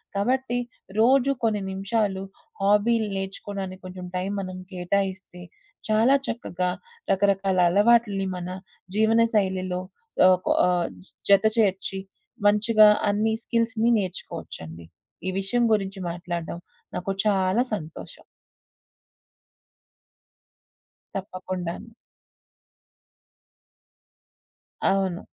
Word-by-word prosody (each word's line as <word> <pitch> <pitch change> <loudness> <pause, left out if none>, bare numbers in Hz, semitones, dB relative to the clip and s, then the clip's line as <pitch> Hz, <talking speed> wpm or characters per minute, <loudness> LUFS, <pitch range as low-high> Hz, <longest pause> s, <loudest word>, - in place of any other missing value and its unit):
కాబట్టి 245 +4 0 0.4
రోజు 260 +4 +4
కొన్ని 215 -3 +1
నిమిషాలు 195 0 -1 0.4
హాబీలు 210 +2 +3
నేర్చుకోడానికి 195 0 -5
కొంచెం 185 0 -7
టైం 185 +2 -1
మనం 185 -1 -5
కేటాయిస్తే, 185 0 -2 0.5
చాలా 225 +5 +5
చక్కగా 180 -6 -2 0.4
రకరకాల 195 -1 +2
అలవాట్లి‌ని 205 0 +3
మన 180 0 -5 0.5
జీవనశైలిలో 210 -5 +2 0.4
ఆహ్, 185 0 +6
కొ - - +1 0.2
ఆహ్, 175 -1 +1 0.4
జత 200 +1 +6
చేర్చి, 195 -2 +1 0.5
మంచిగా 215 +1 +6 0.2
అన్ని 215 +2 +1
స్కిల్స్‌ని 230 0 +1
నేర్చుకోవచ్చండి. 85 - -6 0.4
ఈ 185 - +1
విషయం 240 +5 +1
గురించి 195 -2 -1
మాట్లాడడం 170 -1 -5 0.4
నాకు 195 +2 -2
చాలా 195 +3 +2
సంతోషం. 160 -5 -9 2.9
తప్పకుండాను. 185 -1 -5 2.9
అవును. 190 -2 +1
195 Hz, 80 wpm, -25 LUFS, 185-220 Hz, 2.9 s, ఆహ్